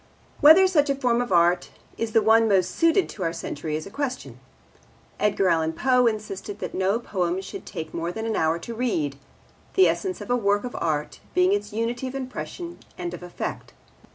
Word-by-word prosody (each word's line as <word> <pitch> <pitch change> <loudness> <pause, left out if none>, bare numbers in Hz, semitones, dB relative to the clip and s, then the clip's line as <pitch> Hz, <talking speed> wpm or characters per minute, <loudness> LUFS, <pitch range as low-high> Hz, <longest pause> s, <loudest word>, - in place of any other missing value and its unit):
Whether 320 +6 +8
such 305 -6 +3
a 275 - +2
form 245 -3 +1
of 245 - -4
art 175 0 +3 0.3
is 230 -1 -3
the 225 - +4
one 225 +1 +5
most 190 -3 +3
suited 330 +3 +3
to 200 - -9
our 165 -2 0
century 155 -2 -4
is 155 - -4
a 195 - -10
question. 270 0 -4 0.8
Edgar 200 -2 +2
Allan 160 -1 +1
Poe 250 +6 +3
insisted 210 -2 -4
that - - -5
no 190 +3 +1
poem 185 -6 -1
should 190 - -8
take 160 -1 -6
more 170 +1 -2
than 220 +5 -5
an 225 -1 -1
hour 160 +1 +1
to 200 +8 -7
read, 190 - -1 0.6
the 380 - +6
essence 375 -2 -1
of - - -6
a - - +4
work 205 -3 +1
of 250 - -6
art 150 -2 -2 0.2
being 180 +1 +4
its 205 0 -2
unity 230 +4 -2
of 255 - -7
impression 305 +6 -6 0.2
and 175 -1 -4
of 175 - -7
effect. 180 0 -6
210 Hz, 200 wpm, -25 LUFS, 175-250 Hz, 0.8 s, Whether